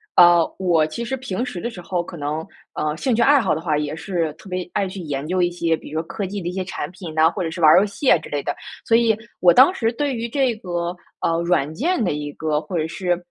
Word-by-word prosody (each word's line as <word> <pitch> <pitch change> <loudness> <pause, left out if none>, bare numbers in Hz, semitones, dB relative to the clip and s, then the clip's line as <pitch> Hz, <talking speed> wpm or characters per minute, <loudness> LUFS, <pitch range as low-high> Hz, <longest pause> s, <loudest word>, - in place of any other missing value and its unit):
呃， 175 -1 +8 0.2
我 170 -5 +2
其 195 +10 -5
实 265 +3 -3
平 245 -3 -3
时 220 -8 -6
的 235 - -3
时 195 -7 -9
候 175 0 -2
可 175 - -9
能， 150 +1 -4 0.3
呃， 150 0 -1
兴 250 +10 0
趣 230 - +2
爱 285 -1 +5
好 - - +1
的 - - -2
话 160 -3 0
也 150 0 -2
是 165 -1 -2
特 195 - -16
别 180 -1 -4
爱 195 - 0
去 185 0 -7
研 145 -3 -4
究 185 +2 0
一 175 0 +2
些， 170 -2 0
比 - - -11
如 155 - -1
说 160 - -5
科 205 - -4
技 200 +2 -4
的 170 - -5
一 - - -1
些 190 0 -2
产 180 -5 -5
品 175 -3 -8
哪， 160 +1 +5
或 185 +2 -4
者 165 - -3
是 170 - -7
玩 160 -2 +7
儿 - - +8
游 - - +2
戏 210 +7 -1
啊 - - +7
之 - - -11
类 145 -1 -2
的。 - - -3 0.3
所 225 - +3
以 230 -2 +3 0.2
我 175 -1 +7
当 265 - +7
时 225 -10 0
对 275 +2 -2
于 235 0 -3
这 260 -2 +1
个， 175 -4 -3 0.2
呃， 165 0 0
软 170 -4 +1
件 315 - 0
的 190 - +1
一 145 0 -4
个 155 -1 -1
或 170 +3 -4
者 155 - -1
是， 175 +1 -1
175 Hz, 305 characters per minute, -21 LUFS, 160-215 Hz, 0.3 s, 呃